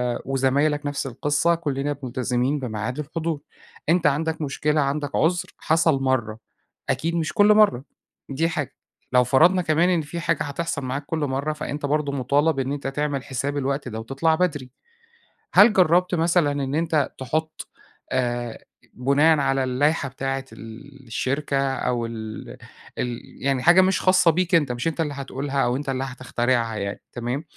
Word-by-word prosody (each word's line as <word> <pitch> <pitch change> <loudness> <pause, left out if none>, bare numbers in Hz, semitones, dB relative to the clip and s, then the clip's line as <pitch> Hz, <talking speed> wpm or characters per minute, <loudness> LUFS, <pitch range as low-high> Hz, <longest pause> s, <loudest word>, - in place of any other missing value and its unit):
آآ، - - -6
وزمايلك 140 +3 +1
نفْس 145 -1 -2
القِصّة 145 +6 +1
كُلِّنا 145 -3 -2
مُلتزمين 125 +2 -1
بميعاد 125 +1 -4
الحضور، 155 0 -3 0.5
أنت 170 -1 +4
عندك 160 +3 0
مشكلة، 150 +1 0
عندك 140 +1 -2
عُذر، 175 +2 +1
حصل 160 -3 +2
مرَّة 115 -5 0 0.5
أكيد 165 +2 0
مش 165 0 -1
كل 205 +2 +6
مرَّة. 210 - +4 0.5
دي 160 +5 0
حاجة. 145 -4 -3 0.4
لو 125 0 +6
فرَضنا 165 +9 +4
كمان 165 +2 +2
إن 175 -3 +2
في 150 +3 -6
حاجة 165 -2 0
هتحصَل 145 +1 -3
معاك 135 +3 -3
كل 160 +1 -3
مرَّة، 145 +1 -1
فأنت 150 -1 -4
برضه 145 0 0
مُطالب 140 +3 +1
إن 135 0 -1
أنت 140 -1 -4
تعمل 140 -1 -2
حساب 140 +2 -3
الوقت 140 -1 -2
ده 110 -1 -5
وتطلَع 135 +8 0
بدري. 145 -7 -1 0.8
هل 225 - +7
جرّبت 180 0 +3
مثلًا 165 -2 +2
إن 140 -1 -2
أنت 160 -3 +1
تحُط 155 +5 -3 0.4
آآ 120 -2 -1 0.3
بُناءً 145 +5 +3
على 135 -1 +1
اللايحة 135 +3 +1
بتاعة 135 +1 -3
ال 130 +4 -12
الشركة 140 +5 -1 0.2
أو 120 -3 -1
ال 110 -1 -7 0.4
ال 120 -1 -3 0.2
يعني 135 -2 +1
حاجة 175 +2 +7
مش 190 0 +2
خاصة 185 -2 +5
بيك 180 +2 +1
أنت، 145 -6 +2
مش 125 +5 -3
أنت 165 0 -1
اللي 150 -3 -2
هتقولها 140 0 -2
أو 120 - +1
أنت 140 +1 -4
اللي 130 0 -1
هتخترعها 120 -3 -1
يعني، 100 -1 -4
تمام؟ 125 +5 -3
140 Hz, 160 wpm, -23 LUFS, 130-160 Hz, 0.8 s, هل